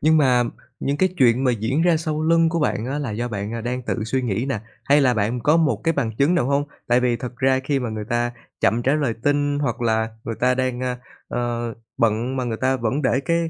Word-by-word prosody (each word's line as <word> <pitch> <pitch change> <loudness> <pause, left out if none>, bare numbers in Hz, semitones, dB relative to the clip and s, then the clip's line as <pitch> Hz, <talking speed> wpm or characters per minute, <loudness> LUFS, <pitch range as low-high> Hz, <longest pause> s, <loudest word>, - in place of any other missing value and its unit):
Nhưng 160 +1 +4
mà 125 -4 +4 0.4
những 140 +1 0
cái 185 +4 +3
chuyện 125 0 +4
mà 125 - +3
diễn 115 +7 0
ra 175 -1 +4
sau 155 -1 -2
lưng 165 0 +4
của 165 0 -1
bạn 125 -5 0
á 140 +3 -2
là 135 -6 -3
do 120 +3 -3
bạn, 105 -1 -4
à, 115 - -3
đang 125 +2 -3
tự 110 -2 -2
suy 130 +3 -1
nghĩ 115 +2 -1
nè, 110 -6 -1 0.2
hay 140 +5 +5
là 130 -3 +3
bạn 110 +3 0
có 150 +7 +4
một 140 -10 +2
cái 165 - +3
bằng 115 -6 -2
chứng 145 +6 +3
nào 170 -8 +2
hông? 140 +1 +1 0.2
Tại 120 +1 +4
vì 125 -1 +1
thật 125 0 -7
ra 130 +1 +2
khi 140 0 +1
mà 120 - -3
người 110 -1 -4
ta 120 0 0 0.3
chậm 115 +2 +2
trả 135 +4 +2
lời 140 -7 0
tin, 145 0 +1
hoặc 120 -4 -2
là 110 -1 +1 0.2
người 115 - -3
ta 125 +1 +3
đang, 130 -1 -1 0.5
ơ, 120 -2 -2 0.2
bận, 115 +4 +1
mà 130 - -1
người 115 -2 -2
ta 130 0 +2
vẫn 125 +4 -1
để 130 0 +2
cái 170 +3 +2
125 Hz, 255 wpm, -22 LUFS, 115-145 Hz, 0.5 s, hay